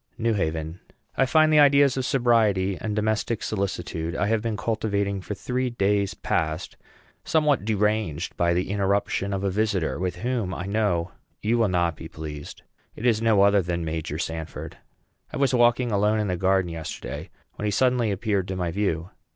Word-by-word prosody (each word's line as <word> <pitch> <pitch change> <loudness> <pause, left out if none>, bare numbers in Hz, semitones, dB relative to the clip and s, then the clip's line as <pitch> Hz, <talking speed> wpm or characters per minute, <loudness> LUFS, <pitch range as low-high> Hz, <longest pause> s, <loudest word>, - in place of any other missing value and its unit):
NEW 115 0 +1
HAVEN. 80 -3 -2 0.4
I 135 - +2
find 155 +2 +4
the 150 - +6
ideas 140 -2 +5
of 130 -1 -1
sobriety 110 -7 +2
and 105 -1 -2
domestic 110 +1 0
solitude 90 -5 -3
I 100 - 0
have 110 +1 +1
been 115 -2 -2
cultivating 100 -2 -1
for 105 - -5
three 125 +4 -2
days 100 -3 0
past 80 -1 -2 0.5
somewhat 150 -7 +2
deranged 105 -6 0
by 85 0 +2
the 90 +2 -1
interruption 100 0 0
of 95 0 -2
a 100 - +1
visitor, 100 -5 0
with 90 -1 -2
whom 115 -2 -2
I 90 - -5
know 100 -4 0 0.3
you 115 +3 +2
will 115 - +4
not 85 -2 +1
be 80 - -9
pleased. 75 -2 -8 0.3
It 115 - -6
is 115 -3 +3
no 110 -3 +4
other 100 0 +5
than 85 -1 -3
Major 80 -1 -3
Sanford. 80 -1 -5 0.5
I - - -5
was 135 -2 +2
walking 120 0 +3
alone 105 +1 +2
in 105 -2 -1
the 90 - 0
garden 95 0 +2
yesterday, 80 -1 -6 0.3
when 105 - -4
he 105 - +1
suddenly 125 +1 +2
appeared 100 -1 -1
to 95 - -3
my 90 -2 -2
view. 85 -2 -1
100 Hz, 180 wpm, -25 LUFS, 90-115 Hz, 0.5 s, the